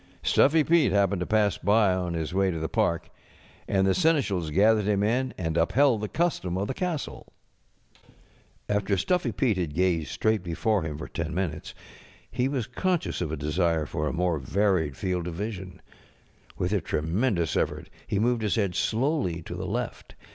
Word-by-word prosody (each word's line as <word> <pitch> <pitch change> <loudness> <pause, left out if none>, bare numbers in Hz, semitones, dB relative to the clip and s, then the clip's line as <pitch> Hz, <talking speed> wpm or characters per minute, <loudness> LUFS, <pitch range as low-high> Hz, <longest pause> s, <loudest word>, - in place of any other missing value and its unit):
StufiTy 150 +2 +4
Pete 160 - +4
happened 100 -1 +2
to 90 - -3
pass 105 -2 +2
by 100 0 +3
on 90 -2 -2
his 80 0 -3
way 95 0 +2
to 85 - -2
the 80 0 -2
park, 85 +2 0 0.6
and 95 -1 +2
the 95 - +3
seneschals 140 - +1
gathered 105 +6 +3
him 100 -1 +1
in 125 +4 +1
and 80 -2 -2
upheld 120 +7 +3
the 105 - -2
custom 150 - -1
of 100 +2 -1
the - - -2
castle. 170 -2 -4 1.4
After 100 -1 0
Stuffy 180 - 0
Fete 120 -8 +1
had 80 -5 -3
gazed 85 -3 +1
straight 110 -2 +1
before 95 +4 0
him 80 -2 -4
for 75 - -6
ten 80 -1 -4
minutes 85 -5 -3 0.6
he 125 - 0
was 135 -5 -2
conscious 175 - -1
of 80 -4 -2
a 80 - -3
desire 80 +2 0
for 75 +1 -3
a - - -1
more 85 -2 0
varied 85 -1 0
field 90 -2 -2
of 85 - -5
vision. 95 -2 -6 0.7
With 90 +3 -1
a 100 - +1
tremendous 85 - 0
effort - - -1 0.2
he 100 - -1
moved 120 +2 +1
his 105 -2 0
head 100 -5 0
slowly 115 - 0
to - - -7
the - - -5
left. - - -4
95 Hz, 180 wpm, -27 LUFS, 85-110 Hz, 1.4 s, StufiTy